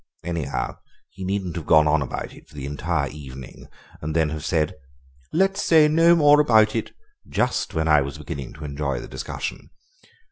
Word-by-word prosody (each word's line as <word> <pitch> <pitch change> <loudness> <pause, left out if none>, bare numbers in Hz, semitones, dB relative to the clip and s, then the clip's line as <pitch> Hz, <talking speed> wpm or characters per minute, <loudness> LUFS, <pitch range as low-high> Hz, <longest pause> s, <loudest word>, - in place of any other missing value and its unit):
"Anyhow, 85 -5 -3 0.3
he 95 +3 -9
needn't 95 -2 -2
have 85 - -6
gone 75 -1 +6
on 75 0 +3
about 70 - -5
it - - -17
for - - -18
the 70 -2 -6
entire 75 +1 -1
evening 65 -2 -10 0.3
and 75 +1 -4
then 80 -2 +2
have 75 -1 -5
said, 80 -3 0 0.6
'Let's 195 +3 +2
say 160 -2 +5
no 165 +3 +5
more 150 -2 +6
about 110 -6 +4
it' 115 - -3 0.4
just 125 -7 -1
when 80 0 0
I 75 -2 +5
was 70 0 -5
beginning 70 -3 -7
to 75 - -9
enjoy 70 -3 -2
the - - -8
discussion. 65 - -6
80 Hz, 180 wpm, -23 LUFS, 75-110 Hz, 0.6 s, gone